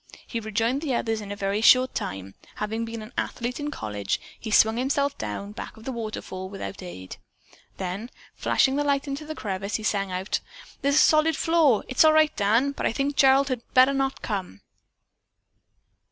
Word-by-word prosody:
He 230 - -4
rejoined 225 +5 -1
the 280 -6 -1
others 225 -2 -1
in 205 -1 -7
a - - -3
very 200 +1 -1
short 255 +3 +6
time. 95 0 -5 0.2
Having 220 +2 -3
been 230 -1 -6
an 215 - -12
athlete 245 +2 -3
in 295 0 -3
college, 105 - -3 0.2
he 225 - -6
swung 220 +1 +4
himself 280 +2 0
down 105 - -4
and 205 +1 -10
back - - -8
of 220 - -13
the 265 - -4
waterfall 215 -5 -5
without 195 0 -7
aid. 95 - -9 0.6
Then 190 +5 -4 0.2
flashing 270 0 +2
the 290 - +1
light 280 0 0
into 280 +2 -5
the 310 - -5
crevice, 200 -3 -3
he 215 - -3
sang 200 -2 0
out: 185 +2 -2 0.4
"There's 280 0 +2
a - - +4
solid 310 +1 +5
floor, 315 -9 +3 0.2
all 310 0 +6
right, 310 -1 +4
Dan, 225 +7 +2
but 280 - -2
I - - 0
think 275 +4 -1
Gerald 275 0 +5
had 255 -3 -2
better 260 +2 +6
not 270 0 -1
come." 185 - -4
230 Hz, 190 wpm, -25 LUFS, 200-275 Hz, 0.6 s, short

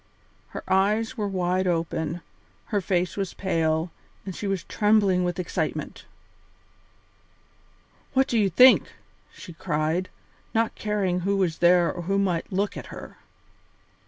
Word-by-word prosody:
Her - - -8
eyes 210 +6 +1
were 210 -4 -2
wide 185 -1 0
open, 165 -1 -2 0.5
her 205 - +2
face 180 -1 0
was 195 -3 -3
pale, 165 -3 0 0.3
and 190 -3 -6
she 205 - -4
was 195 -3 -1
trembling 205 -4 +2
with 175 -1 -2
excitement. 180 - -3 2.1
"What 265 0 +3
do 235 - +1
you 200 -2 +3
think!" 250 +9 +6 0.4
she 175 - -11
cried, 160 +2 -1 0.5
not 225 0 +1
caring 200 -4 -1
who 195 +2 0
was 180 -4 0
there 175 0 +4
or 175 - -6
who 195 +3 -1
might 185 -4 -1
look 200 +2 -1
at - - -7
her. - - -10
185 Hz, 135 wpm, -25 LUFS, 175-200 Hz, 2.1 s, think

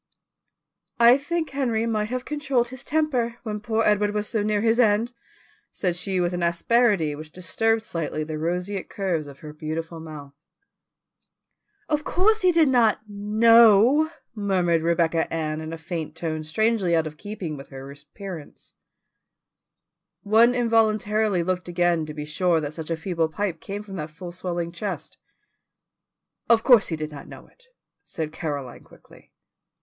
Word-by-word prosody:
"I 235 +1 +8
think 325 +3 -2
Henry 240 -5 0
might 215 -2 -1
have 255 +1 -3
controlled 275 -5 0
his 260 +1 -7
temper, 270 -7 0
when 210 -3 -4
poor 220 +1 0
Edward 210 0 +2
was 210 0 -1
so 220 - -1
near 210 0 0
his 230 +1 +2
end," 225 +1 +3 0.6
said 180 -3 -1
she 185 +1 -1
with 175 0 0
an 175 - -2
asperity 170 -1 +2
which 155 +1 -9
disturbed 225 +6 0
slightly 160 -5 -3
the 155 0 -5
roseate 180 +4 -3
curves 180 -7 -2
of 140 -1 -13
her 150 -1 -9
beautiful 160 +2 -5
mouth. 150 -3 -10 1.5
"Of 300 0 0
course 430 +7 +2
he 365 - +5
did 330 -3 +4
not 240 -5 +3
KNOW," 225 +6 +5 0.2
murmured 185 -6 +1
Rebecca 165 0 +1
Ann 155 -1 -2
in 160 0 -6
a 165 - -5
faint 160 -1 -5
tone 160 -1 -3
strangely 195 +2 +1
out 160 -1 +2
of 155 -1 -6
keeping 200 -6 -6
with 135 -1 -10
her 135 0 -9
appearance. 150 +3 -10 1.5
One 230 +4 +5
involuntarily 215 -4 +2
looked 185 +1 -2
again 175 -2 +1
to 150 - -6
be 150 -1 -5
sure 165 +2 +1
that 150 -1 -4
such 160 0 -7
a 165 - -1
feeble 165 -1 -1
pipe 175 -1 -3
came 205 +1 -6
from 195 -2 -8
that 155 -1 -5
full 175 +3 -9
swelling 175 -1 -4
chest. 195 +4 -6 1.3
"Of 230 -1 +5
course 240 -5 +6
he 165 - -2
did 155 0 -5
not 145 -2 -10
know - - -12
it," - - -19 0.4
said 155 -2 -5
Caroline 145 -6 -5
quickly. - - -19
190 Hz, 160 wpm, -24 LUFS, 160-225 Hz, 1.5 s, I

